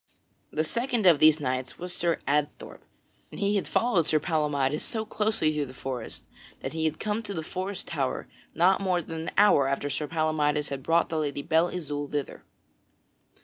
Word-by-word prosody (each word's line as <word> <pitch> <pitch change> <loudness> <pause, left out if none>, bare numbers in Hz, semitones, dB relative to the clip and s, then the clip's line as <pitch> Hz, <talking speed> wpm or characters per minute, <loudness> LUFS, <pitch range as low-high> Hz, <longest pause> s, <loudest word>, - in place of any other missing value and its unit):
The 155 - 0
second 235 +4 -1
of 170 -5 +7
these 155 0 +6
knights 130 -2 -3
was 180 0 -5
Sir 170 -1 0
Adthorp, 150 0 -1 0.5
and - - -9
he 200 +1 +1
had 200 - 0
followed 200 -9 +2
Sir 155 - +3
Palamydes 150 -2 0
so 220 -1 -3
closely 210 -7 0
through 150 -2 -1
the 130 - -12
forest 125 -3 -5 0.4
that - - -4
he 160 0 -1
had 155 0 -1
come 215 +1 -1
to 205 -3 -6
the 160 - -3
forest 185 +4 -4
tower 140 -6 -2 0.3
not 185 +4 +4
more 180 -3 +1
than 160 0 -5
an - - -2
hour 195 -9 +6
after 140 +1 -1
Sir 150 +2 -2
Palamydes 155 -2 0
had 140 -1 -4
brought 165 +4 +2
the 160 - -1
Lady 145 -2 -2
Belle 165 +2 +3
Isoult 145 -5 -4
thither. 145 -1 -3
155 Hz, 190 wpm, -27 LUFS, 145-185 Hz, 0.5 s, of